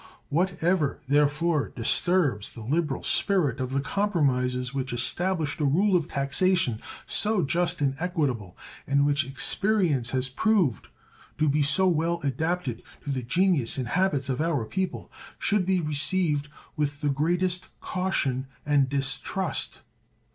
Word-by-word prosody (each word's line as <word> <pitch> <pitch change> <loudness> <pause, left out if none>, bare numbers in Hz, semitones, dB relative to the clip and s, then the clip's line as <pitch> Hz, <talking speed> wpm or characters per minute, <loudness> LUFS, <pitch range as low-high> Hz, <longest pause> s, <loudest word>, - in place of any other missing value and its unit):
What 175 +3 0
ever, 165 -5 +1
therefore, 150 +2 +2
disturbs 135 - 0
the 115 - -8
liberal 150 +3 -1
spirit 170 - +1
of 130 -1 -2
the 135 +1 0
compromises 130 -9 0
which 135 -1 -3
established 160 +5 -1
a - - 0
rule 185 +8 +3
of 170 -4 +1
taxation 140 - +1 0.2
so 210 -3 +2
just 170 +2 0
and 135 -2 +2
equitable, 145 - -2 0.3
and 140 0 +3
which 145 0 +2
experience 145 - 0
has 130 0 0
proved 170 - +1 0.5
to 155 - +2
be 150 +1 +2
so 185 +6 +4
well 170 0 +1
adapted 140 -2 -1 0.2
to 145 - -3
the 130 -2 -1
genius 145 0 +1
and 125 -4 -3
habits 160 -7 +1
of 130 +1 -1
our 160 -8 0
people, 190 +10 -3 0.3
should 200 -4 +1
be 190 -1 +3
received 150 0 +1 0.3
with 145 -1 -2
the 145 - +1
greatest 175 +5 +1
caution 140 -9 -1 0.2
and 145 -2 +3
distrust. 140 +5 -2
150 Hz, 140 wpm, -26 LUFS, 135-180 Hz, 0.5 s, so